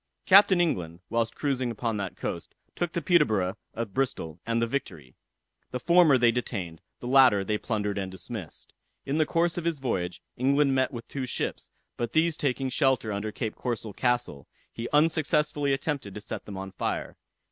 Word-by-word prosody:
Captain 195 -1 +7
England, 90 - 0
whilst 115 0 0
cruising 130 -4 -1
upon 115 0 -2
that 100 -2 -4
coast, - - -5 0.2
took 175 -2 -1
the 170 - -3
Peterborough 110 - +3 0.2
of 115 -3 -4
Bristol, 90 - -2
and 115 0 +1
the 115 - +2
Victory. 80 - -5 0.6
The 125 - -4
former 170 -1 +5
they 120 -1 +5
detained, 95 -9 -4 0.2
the 120 - -5
latter 130 -6 +6
they 105 +2 -1
plundered 105 -3 -2
and 95 -1 -4
dismissed. 95 -2 -8 0.3
In 145 +3 -1
the 155 - +3
course 170 +1 +1
of 170 - -7
his 170 -2 0
voyage, 90 -10 -2 0.2
England 140 +2 +3
met 130 +1 +2
with 120 -3 -7
two 130 -2 -4
ships, - - -3 0.3
but 120 -1 -3
these 160 0 +3
taking 135 -2 -1
shelter 130 -5 +1
under 105 +2 -3
Cape 110 0 -3
Corso 115 -4 -4
Castle, 120 - -1 0.3
he 115 +1 -5
unsuccessfully 150 -2 +2
attempted 135 -7 -2
to 105 - -6
set - - -6
them 100 -2 -7
on 95 0 -6
fire. 95 - -3
125 Hz, 180 wpm, -27 LUFS, 105-145 Hz, 0.6 s, Captain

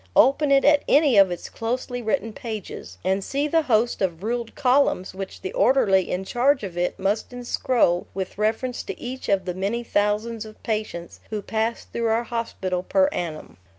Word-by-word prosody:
Open 280 +3 +5
it 275 0 +5
at 290 0 +6
any 285 -4 +5
of 195 -2 +7
its 175 - -5
closely 245 +2 -3
written 225 -1 -1
pages 210 - -7
and 190 +1 0
see 285 +6 -1
the 325 +2 +3
host 235 -5 +1
of 180 -2 -1
ruled 235 +1 -3
columns 255 -9 +2
which 195 0 -7
the 380 +3 -5
orderly 250 - +3
in 180 +1 -2
charge 255 +4 +2
of 185 -4 -6
it 175 0 -1
must 200 +3 -1
inscroll 245 -6 +1
with 190 +1 -5
reference 225 +4 0
to - - -7
each 255 +2 -6
of 195 -2 +2
the 180 - -2
many 200 +6 -2
thousands 215 +1 0
of 215 -1 -13
patients 215 -6 -4
who 215 - -2
pass 225 +3 -1
through 235 -1 -2
our 225 +1 +2
hospital 195 -6 -3
per 285 +7 +2
annum. 165 - -5
225 Hz, 185 wpm, -24 LUFS, 195-255 Hz, -, of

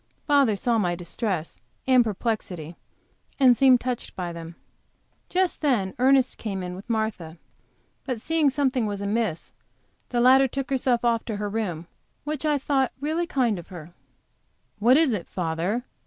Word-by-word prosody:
Father 280 -7 +3
saw 230 +3 +1
my 175 -4 0
distress 175 -1 -4 0.3
and 255 -2 +5
perplexity, 190 -7 -3 0.6
and 255 -3 +6
seemed 260 0 +5
touched 250 -1 -4
by 175 -2 -4
them. 165 0 -9 0.7
Just 370 0 0
then 235 -11 +1
Ernest 260 0 +3
came 195 -4 -4
in 180 0 -5
with 195 +5 -11
Martha, 220 -8 -2 0.7
but 255 -4 -3
seeing 320 +4 +1
that - - +3
something 265 -5 +1
was 200 -1 -4
amiss, 200 -4 -2 0.6
the 240 - -1
latter 260 +2 +6
took 270 +1 -5
herself 250 -2 +1
off 230 -1 +2
to 225 - -3
her 205 0 -3
room, 195 -7 -3 0.4
which 305 0 -3
I 295 -1 +2
thought 270 -1 0
really 315 +4 -1
kind 240 - 0
of 170 - -11
her. 170 -2 -11 0.9
"What 240 +6 +5
is 315 -4 +4
it, 195 -5 -4
father? 180 +7 -2
230 Hz, 160 wpm, -25 LUFS, 190-265 Hz, 0.9 s, and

